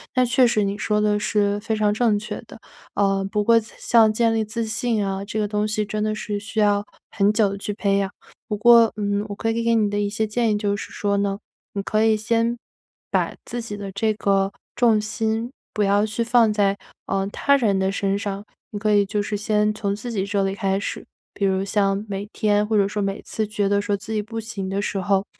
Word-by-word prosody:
那 255 0 +4
确 245 +1 +4
实 215 -3 +2
你 200 0 -2
说 210 0 0
的 210 0 +2
是 205 -1 +1
非 220 +1 -2
常 210 -1 +2
正 220 -1 +2
确 210 +2 -6
的。 - - -11 0.4
呃， 195 -1 +1
不 210 0 0
过 230 +2 +5
像 225 0 +2
建 230 +1 +2
立 220 -1 0
自 225 +2 -3
信 225 -1 -1
啊， 195 0 -3
这 210 +1 -5
个 210 -1 0
东 210 0 0
西 215 0 -1
真 215 0 -3
的 215 0 0
是 210 -1 -3
需 215 +1 -2
要 205 0 +2 0.3
很 200 0 +3
久 205 -3 +2
去 205 +1 -4
培 200 -1 +1
养。 195 -1 0 0.4
不 210 - -2
过， 230 +1 +6
嗯， 205 -1 -1
我 205 - -6
可 225 +2 -2
以 230 +1 -1
给 230 0 +3
你 215 -2 +2
的 205 0 -1
一 205 0 0
些 220 +1 -1
建 225 +1 0
议 210 - +1
就 205 -1 -1
是 - - -8
说 200 -1 0
呢， 200 0 -1 0.3
你 200 - -2
可 215 +2 +1
以 220 -1 +4
先 230 +2 0 0.5
把 - - 0
自 240 - -4
己 225 -3 -6
的 200 -1 -6
这 215 +3 0
个 195 -1 +1 0.2
重 230 -3 +4
心 220 +2 -2 0.2
不 210 - +1
要 200 +1 +3
去 215 +2 -2
放 230 -2 +4
在， 200 -1 +2 0.3
呃， 195 0 0
他 280 +7 +2
人 215 -7 +2
的 190 0 +1
身 195 0 0
上， 200 -1 -4 0.3
你 205 - -4
可 215 +1 +1
以 205 -1 +4
就 205 +1 -1
是 205 +1 -3
先 210 +1 +1
从 200 -1 -2
自 215 +4 -7
己 195 -4 -1
这 200 0 0
里 195 0 0
开 195 -2 0
始。 - - -5 0.3
比 200 - -3
如 190 0 +1
像 200 0 0
每 200 0 -4
天 210 -1 +1
或 215 0 +1
者 200 -1 +3
说 205 +1 -3
每 195 0 -2
次 220 - -3
觉 210 -1 -1
得 200 0 +2
说 205 0 -1
自 215 +2 -7
己 215 - 0
不 225 +2 -6
行 215 -4 -5
的 195 +1 -1
时 200 - -2
候， 195 +1 +1
210 Hz, 255 characters per minute, -23 LUFS, 200-220 Hz, 0.5 s, 过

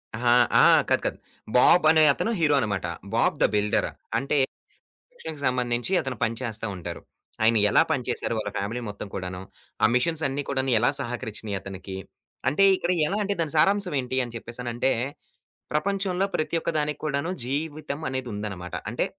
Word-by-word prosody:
అహా! 120 +1 +3 0.3
ఆ! - - +6 0.3
కాదు. - - +3
కాదు. - - -1 0.4
బాబ్ 175 +7 +6
అనే 155 -1 +5
అతను 230 - -1
హీరో 150 -3 +4
అనమాట. 100 -6 -1 0.3
'బాబ్ - - +2
ద - - +7
బిల్డర్' 105 0 +1 0.3
అంటే 140 +4 0 0.6
కన్‌స్ట్రక్షన్‌కి 160 - -11
సంబంధించి 125 +4 -1
అతను 130 -3 -5
పని 115 +1 0
చేస్తా 115 -2 -4
ఉంటారు. 90 - -7 0.4
ఆయన 115 0 +5
ఎలా - - +5
పని 125 -2 0
చేసారు 120 - -1
వాళ్ళ 105 -1 -2
ఫ్యామిలీ 110 +5 -3
మొత్తం 100 0 -7
కూడాను? 90 -1 -5 0.4
ఆ - - +9
మిషిన్స్ 160 +5 +1
అన్ని 135 +2 -2
కూడాను 135 -1 0
ఎలా 120 - +3
సహకరిచ్చినయి 110 -5 -4
అతనికి? 95 0 -7 0.5
అంటే 175 +8 +3
ఇక్కడ 180 -1 -1 0.2
ఎలా 200 - -1
అంటే 200 0 0
దాని 155 -2 -2
సారాంశం 195 +1 +3
ఏంటి? 130 +1 -3
అని 120 - -10
చెప్పేసనంటే 120 +2 -2 0.8
ప్రపంచంలో 190 +3 0
ప్రతి 155 +2 -1
ఒక్క - - -2
దానికి 150 0 -2
కూడాను 145 +3 -1 0.2
జీవితం 150 +2 -3
అనేది 130 -2 -3
ఉందనమాట. 100 -4 -5 0.2
అంటే - - 0
130 Hz, 165 wpm, -25 LUFS, 110-155 Hz, 0.8 s, ఆ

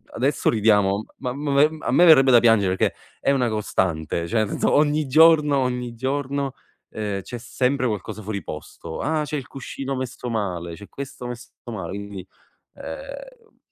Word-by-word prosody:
adesso 135 +3 +1
ridiamo, 105 -2 +3
ma 130 - -3
a - - -4
m 145 +2 +2
a - - -2
me 175 - +6
verrebbe 135 -5 +7
da 120 - +8
piangere 105 -5 +4
perché - - +1 0.2
è - - +2
una 125 -4 +2
costante, 85 -6 -1
cioè 110 +4 +1
nel 105 - -1
senso, - - +1
ogni 150 0 +3
giorno 150 0 +6
ogni 125 -2 -2
giorno, 135 +2 -2 0.4
ehm, 105 -2 -3
c'è 120 +5 -7
sempre 130 +2 0
qualcosa 105 0 -4
fuori 100 -3 -4
posto: 80 +1 -8
ah 155 0 0
c'è 150 - -4
il 135 - -6
cuscino 135 0 -5
messo 125 -1 -5
male, 90 -7 -3
c'è 100 +2 -12
questo 135 -2 -8
messo 120 0 -8 0.2
male, 105 -8 -5
quindi, 100 -1 -7 0.5
ehm - - -9
125 Hz, 170 wpm, -23 LUFS, 105-140 Hz, 0.5 s, da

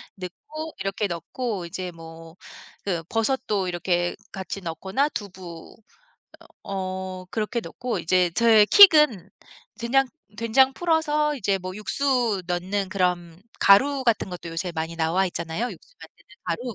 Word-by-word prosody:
넣고 310 - -8
이렇게 195 +1 -1
넣고 190 +3 -4
이제 180 +1 -5
뭐 165 0 -12 0.5
그 175 -4 -2
버섯도 220 -4 0
이렇게 175 0 -1 0.2
같이 195 +1 -6
넣거나 190 - -1
두부 185 - -9 0.9
어 185 -1 -5
그렇게 225 +2 -2
넣고 245 -2 -4
이제 175 +1 +2
저의 220 -2 +6
킥은 300 - +7 0.5
된장 265 +3 +2 0.3
된장 260 +4 +3
풀어서 305 -3 +1
이제 200 -6 0
뭐 185 0 -6
육수 230 -2 0
넣는 185 +2 -2
그런 180 -2 -1 0.2
가루 265 +7 +5
같은 230 -4 +1
것도 175 -2 -7
요새 165 +2 -3
많이 160 +1 -3
나와 165 +4 +1
있잖아요, 170 +7 -3
육수 - - -14
만드는 - - -16
가루. 245 -3 -3
195 Hz, 270 characters per minute, -24 LUFS, 175-245 Hz, 0.9 s, 킥은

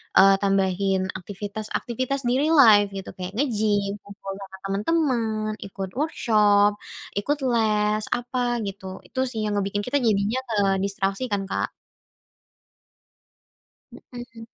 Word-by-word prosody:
eee, 195 0 +7
tambahin 195 -1 +1 0.2
aktivitas-aktivitas 215 +7 -4
di 245 - +2
real 315 +3 +3
life 205 -3 +6
gitu 195 - -6
kayak 180 0 -5
nge-gym, 210 -6 +1
ngobrol 195 -1 -8
sama 190 0 -10
temen-temen, 220 -1 0 0.2
ikut 195 -1 -6
workshop, 210 -9 +3 0.5
ikut 290 +8 0
les, 215 -2 +2
apa 245 +1 -4 0.3
gitu. 195 -1 -7 0.2
Itu 260 - -6
sih 220 - -4
yang 210 -1 -1
ngebikin 200 +1 -2
kita 285 +3 +2
jadinya 220 +1 +1
kedistraksi 195 +1 0
kan, 200 -1 0
Kak. - - 0 2.2
Mhm. 240 -2 -11
210 Hz, 115 wpm, -24 LUFS, 195-235 Hz, 2.2 s, eee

